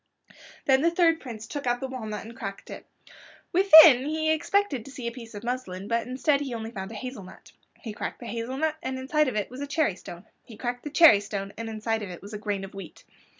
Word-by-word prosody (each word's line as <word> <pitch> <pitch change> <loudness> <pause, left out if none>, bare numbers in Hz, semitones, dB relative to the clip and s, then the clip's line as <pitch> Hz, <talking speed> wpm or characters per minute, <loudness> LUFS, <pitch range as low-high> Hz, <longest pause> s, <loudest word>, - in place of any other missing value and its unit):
Then 265 -1 +4
the 335 - +4
third 335 -1 +3
Prince 230 -6 -8
took 285 0 -6
out 245 0 +1
the 265 - -4
walnut 220 -5 -6
and 230 +1 -11
cracked 200 -3 -7
it. - - -10 0.7
Within 325 -7 +9
it 260 +3 -5
he 315 +1 0
expected 315 - 0
to 275 - -12
see 255 -2 -8
a 235 - -2
piece 230 -2 -11
of 205 - -8
muslin, 220 -6 -4
but 230 +1 -1
instead 275 +3 +1
he 270 -4 -4
found 225 -1 -5
only 225 - -8
a 190 +1 -6
hazel 250 0 -6
nut. 185 - -15 0.3
He 220 - -6
cracked - - -5
the 245 - -9
hazel 235 +3 -4
nut 315 +1 -1
and 260 0 -4
inside 300 +3 +1
of 250 - -2
it 210 +1 -2
was 255 +2 -8
a 285 - -4
cherry 295 - +1
stone. 175 +1 -11 0.2
He 225 - -13
cracked 245 +1 -4
the - - -3
cherry 295 -8 +7
stone 200 -1 -5
and 230 +1 -6
inside 220 0 -2
of 205 - -6
it 175 0 -10
was 205 +2 -10
a 210 - -5
grain 205 -2 -3
of 195 - -9
wheat. 195 -5 -10
245 Hz, 250 wpm, -26 LUFS, 210-285 Hz, 0.7 s, Within